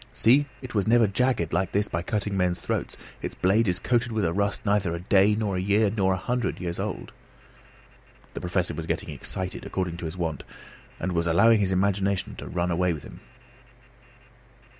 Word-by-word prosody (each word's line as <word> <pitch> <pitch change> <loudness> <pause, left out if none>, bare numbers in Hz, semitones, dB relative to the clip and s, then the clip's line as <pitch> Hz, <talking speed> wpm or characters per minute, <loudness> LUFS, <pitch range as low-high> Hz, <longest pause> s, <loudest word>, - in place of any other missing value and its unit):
See, 135 +5 +4 0.2
it 125 - -7
was 105 -1 0
never 115 0 +5
jagged 105 -4 0
like 95 -1 0
this 105 +1 +2
by 85 - -2
cutting 105 +1 -2
men's 90 -2 +1
throats; - - -3 0.2
its - - -5
blade 105 +5 +2
is 90 -1 +1
coated 120 +3 0
with 110 -4 0
a 85 - 0
rust 100 +3 -1
neither 100 -4 +1
a - - -5
day, 100 +3 +4
nor 105 -3 -1
a - - 0
year, 100 +2 +2
nor 95 -3 +2
a - - -1
hundred 120 +5 -2
years 85 -2 -4
old." - - -4 1.2
The - - -6
Professor 90 0 -1
was 80 -1 -5
getting - - -2
excited 95 -1 -4
according 90 -3 -3
to 85 - -6
his 80 +3 -5
wont, 80 -5 -3 0.6
and 95 - -2
was 85 -1 0
allowing 105 +7 +5
his 95 -2 +1
imagination 100 0 0
to - - -7
run 90 0 -1
away 90 +1 +1
with 75 - -8
him. - - -11
95 Hz, 195 wpm, -26 LUFS, 90-105 Hz, 1.2 s, never